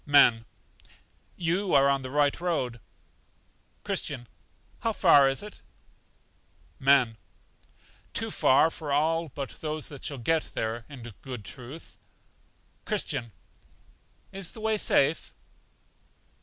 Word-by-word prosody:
Men. 120 -6 +6 0.9
You 180 +2 0
are 140 0 +6
in 135 - -5
the 130 - -6
right 145 +2 +1
road. 130 -10 -1 1.0
Christian. 125 -4 -2 0.5
How 225 - -1
far 145 -9 +6
is 135 +8 -2
it? 210 - -10 1.2
Men. 130 -4 +4 0.9
Too - - -1
far 135 +5 +4
for 150 -3 -6
all 160 +3 +1
but 135 0 -5
those 155 -1 -4
that 145 -3 -10
shall 140 - -2
get 160 +6 0
there, 110 +1 -2
in 135 -5 -10 0.2
good 125 -6 -7
truth. 130 - -8 0.8
Christian. 135 - -2 1.0
Is 195 -3 -4
the - - -8
way 220 0 +1
safe? 160 -6 +2
145 Hz, 115 wpm, -28 LUFS, 130-165 Hz, 1.2 s, Men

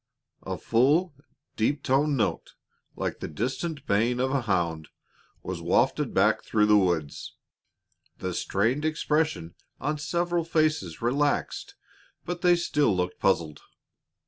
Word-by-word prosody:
_ - - -4
A - - -2
full, 145 +9 +2 0.4
deep 140 +6 0
toned 140 +2 +2
note, 115 - -2 0.4
like - - -3
the - - -4
distant 130 - -3
baying 115 +5 +1
of 130 +1 +1
a 140 -1 +1
hound, 85 -7 -1 0.5
was - - -5
wafted - - +1
back - - +2
through 105 -1 +2
the 105 0 +5
woods. 85 -7 0 0.8
The 90 -1 -4
strained 115 - 0
expression 155 - 0 0.3
on 150 +2 -2
several 175 +2 0
faces 155 - 0
relaxed, 140 +4 0 0.5
but 175 0 -4
they 180 -1 +5
still 150 - +1
looked 90 0 -2
puzzled. 80 -6 0
130 Hz, 130 wpm, -27 LUFS, 95-155 Hz, 0.8 s, the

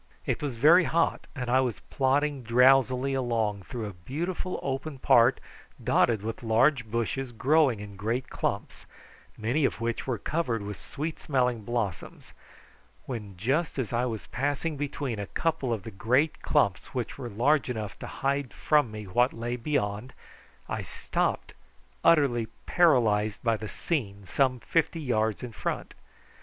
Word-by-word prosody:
It - - -1
was 140 -4 -3
very 160 +9 +6
hot, 165 +2 +1
and 125 -3 -4
I 125 +2 +4
was 125 -5 -2
plodding 140 +1 +1
drowsily 130 +2 +4
along 115 -6 0
through 115 +4 -6
a 105 - -6
beautiful 165 - -4
open 135 +2 -3
part 120 0 +5 0.4
dotted 110 -4 +3
with 115 +1 -4
large 120 +2 +2
bushes 120 +3 -2
growing 135 0 +3
in 100 -1 -9
great 115 +6 -2
clumps, - - -4 0.5
many 120 +8 0
of 135 - +1
which 115 +2 -2
were 125 -3 0
covered 120 -6 -1
with 105 0 -6
sweet 155 +3 -5
smelling 125 -5 0
blossoms, 105 - -4 0.7
when 105 -7 -6
just 140 - 0
as 125 -3 -2
I 120 +1 +1
was 115 -4 -4
passing 145 +4 -2
between 140 -5 -3
a 100 - -4
couple 160 -6 -1
of 110 -5 -2
the 115 - -7
great 130 +10 +1
clumps 100 - +1
which 125 +1 -3
were 125 -3 -5
large 130 +7 +2
enough 110 -5 -4
to - - -6
hide 140 -1 -2
from 150 -5 +3
me 105 0 -7
what 120 +7 +2
lay 120 +1 -3
beyond, 120 -3 -2 0.5
I - - -3
stopped - - -2 0.5
utterly 135 -8 +4 0.2
paralysed 110 - +3
by 115 -2 +3
the 110 0 -6
scene 100 - -3
some 130 +5 +1
fifty 165 0 0
yards 110 -7 0
in 125 - -5
front. - - -4
125 Hz, 155 wpm, -28 LUFS, 110-140 Hz, 0.7 s, very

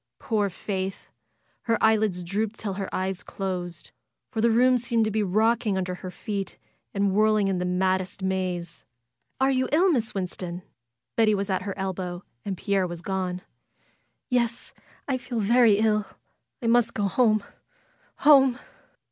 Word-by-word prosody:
Poor 210 -3 0
Faith! 190 0 -4 0.6
Her 230 - +4
lids 215 -5 +2
dropped 205 +5 -2
till 205 -3 -3
her 195 0 -4
eyes 190 0 -2
closed, 180 -3 -5 0.4
for 225 - -1
the 235 - +4
room 250 +2 +4
seemed 235 -2 +1
to 215 - -1
be 215 +1 +1
rocking 215 +1 +2
under 185 -1 -2
her 185 +1 -7
feet 200 +1 -5 0.3
and 200 -1 +1
whirling 215 0 +3
in 190 -2 0
the 180 - -1
maddest 185 +1 0
maze. 185 -3 -2 0.6
FAITH 265 - +4
^^Are 270 - +2
you 255 0 0
ill. 355 +5 +4
Miss 240 -6 -1
Winston?'' 180 -1 -4 0.5
Betty 220 -2 +4
was 200 0 -2
at 185 - 0
her 200 +1 -5
elbow, 185 -2 -4 0.2
and 195 -2 -3
Pierre 195 -1 0
was 175 -1 -6
gone. 185 -1 -3 0.9
'^Yesl 235 -1 0 0.3
I 260 -2 0
feel 245 -1 -5
very 225 0 +5
ill. 215 -1 +2 0.6
I - - -3
must 235 0 +3
go 205 - -1
home. 215 -1 +3 0.8
Home!" 270 -4 +7
200 Hz, 155 wpm, -26 LUFS, 185-225 Hz, 0.9 s, Home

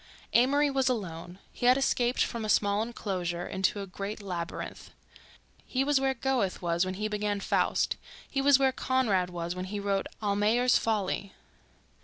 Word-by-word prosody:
Amory 280 +4 +4
was 265 -1 +2
alone—he 185 0 -4
had 250 +1 +6
escaped 250 -2 +2
from 235 -1 -4
a 215 - -3
small 205 0 +3
enclosure 185 -6 -3
into 190 +2 0
a - - -4
great 200 +3 -6
labyrinth. 175 -4 -5 0.7
He 260 +1 -1
was 280 -1 +2
where 270 0 +1
Goethe 245 -6 0
was 170 0 +1
when 185 0 -3
he 210 +2 -2
began 210 -1 -1
"Faust"; - - +1 0.3
he 275 - -1
was 280 -1 +6
where 270 -1 +3
Conrad 230 -9 +1
was 175 -1 -4
when 180 0 -4
he 205 +2 -4
wrote 200 -1 -1
"Almayer's 215 +4 +2
Folly." 200 -3 -1
210 Hz, 160 wpm, -29 LUFS, 185-255 Hz, 0.7 s, had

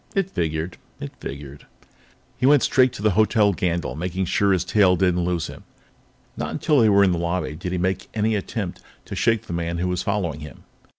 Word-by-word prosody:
It 195 -1 0
figured; 80 +1 -2 0.2
it - - -6
figured. 70 +1 -8 0.7
He 130 - +1
went 145 -2 +5
straight 130 0 +4
to 105 - -8
the 110 - +4
Hotel 105 +1 +3
Gandyll, 85 -2 -1
making 90 +4 -2
sure 100 +3 +1
that 100 - +4
his 90 - -1
tail 95 -1 +4
didn't 90 -1 +1
lose 85 -2 -1
him. - - -10 0.7
Not - - -3
until 150 -3 +1
they 110 -2 +5
were 100 0 +5
in 95 - +4
the 85 - -1
lobby 85 -2 -2
did 90 +2 -5
he 90 - -1
make 95 +1 -1
any 110 +1 +1
attempt 100 -2 -4 0.2
to - - -6
shake 115 -2 +1
the - - -7
man 85 0 -2
who 90 +1 -1
was 90 -1 -1
following 95 -8 -2
him. 75 -4 -11
90 Hz, 215 wpm, -23 LUFS, 85-105 Hz, 0.7 s, went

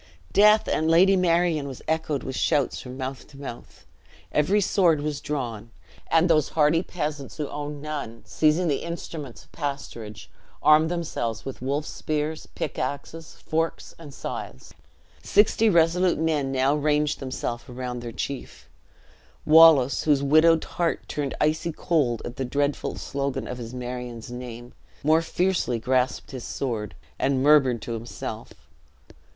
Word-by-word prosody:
"Death 210 +1 +6
and 160 +1 +1
Lady 185 +4 +6
Marion!" 170 -4 +2
was 135 -3 -8
echoed 160 -3 -1
with 130 - -5
shouts 145 -3 +1
from 125 0 -9
mouth 130 0 -5
to 140 - -16
mouth. 135 -4 -9 0.5
Every 165 +8 +2
sword 175 -6 +3
was 145 -1 -3
drawn; 120 -7 -4 0.4
and 165 +2 +4
those 155 -3 +3
hardy 155 +2 +4
peasants 150 -6 -5
who 150 -2 -2
owned 145 0 -6
none, 145 -7 -5
seizing 155 +3 +2
the 145 -3 +1
instruments 165 -6 -7
of - - -27
pasturage, 115 -8 -6 0.4
armed 155 +2 +6
themselves 160 -10 -3
with 135 - -7
wolf 140 +3 -1
spears, 155 0 -3
pickaxes, 145 +4 -4
forks, 165 +1 -2
and 155 -4 -10
scythes. 65 - -7 0.5
Sixty 220 +1 +3
resolute 170 0 +3
men 150 -4 0
now 135 +1 +2
ranged 150 0 +1
themselves 130 -3 -4
around 125 0 -5
their 120 -1 -6
chief. 135 +3 -6 0.7
Wallace, 155 -4 +6
whose 145 -3 +3
widowed 155 +3 +5
heart 170 -1 -2
turned 145 -2 -3
icy 155 +2 +1
cold 145 -8 0
at 120 - -7
the 135 - -1
dreadful 140 +3 -1
slogan 140 -1 -3
of 125 - -6
his 115 -1 -7
Marion's 125 -2 -6
name, 120 -1 -8 0.3
more 155 +2 +4
fiercely 170 -7 0
grasped 125 +2 0
his 130 -3 -6
sword, 115 -6 -4 0.2
and 135 -1 +1
murmured 135 -6 +4
to 120 - -5
himself. 115 +1 -6
145 Hz, 145 wpm, -25 LUFS, 130-160 Hz, 0.7 s, Death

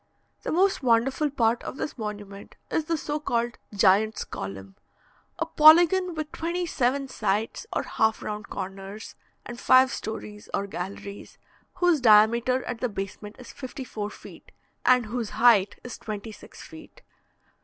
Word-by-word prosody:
The - - -4
most 380 +3 +2
wonderful 260 +4 +2
part 235 -4 +1
of - - -7
this 295 - -4
monument 205 -3 -7 0.2
is 320 - 0
the 330 0 0
so 295 0 -3
called 240 -4 -2
"Giant's 205 +1 +3
Column," 95 0 -8 0.6
a 330 - -1
polygon 335 +3 +6
with 310 -1 -4
twenty 345 +2 -2
seven 275 -3 0
sides 220 - -2
or - - -1
half 220 0 0
round 210 0 -5
corners, 195 +2 -7 0.3
and 240 0 -8
five 260 0 +5
stories 210 -3 -7
or 200 - -1
galleries, 200 +1 -7 0.4
whose 355 -5 +2
diameter 235 +3 +5
at 245 -2 -5
the 250 - -1
basement 205 +1 -6
is 250 - -12
fifty 265 -1 -7
four 210 -4 -5
feet, - - -14 0.3
and 250 -2 +4
whose 230 0 -4
height 215 -5 +4
is 245 - -8
twenty 215 +1 -6
six 210 - -13
feet. - - -14
235 Hz, 150 wpm, -26 LUFS, 210-280 Hz, 0.6 s, polygon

